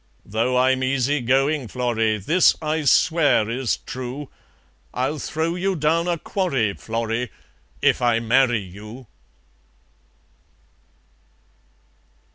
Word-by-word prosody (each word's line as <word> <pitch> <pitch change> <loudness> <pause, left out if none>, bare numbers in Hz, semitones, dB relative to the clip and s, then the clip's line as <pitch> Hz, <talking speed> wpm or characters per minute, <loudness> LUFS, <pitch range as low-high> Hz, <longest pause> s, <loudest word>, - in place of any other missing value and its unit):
Though 115 +4 0
I'm 130 +1 +3
easygoin', 135 +1 +1
Florrie, 115 -2 0
This 160 - +3
I 155 0 -2
swear 150 -5 +3
is 120 +1 -1
true, 130 +3 -6 0.6
I'll 135 +5 -1
throw 160 +3 -2
you 190 +2 -1
down 165 +2 +1
a 175 -1 0
quarry, 135 - -1
Florrie, 115 +2 -3 0.5
If - - +3
I 120 -2 +3
marry 120 0 +2
you." 105 +7 -11
130 Hz, 95 wpm, -22 LUFS, 115-150 Hz, 0.6 s, I'm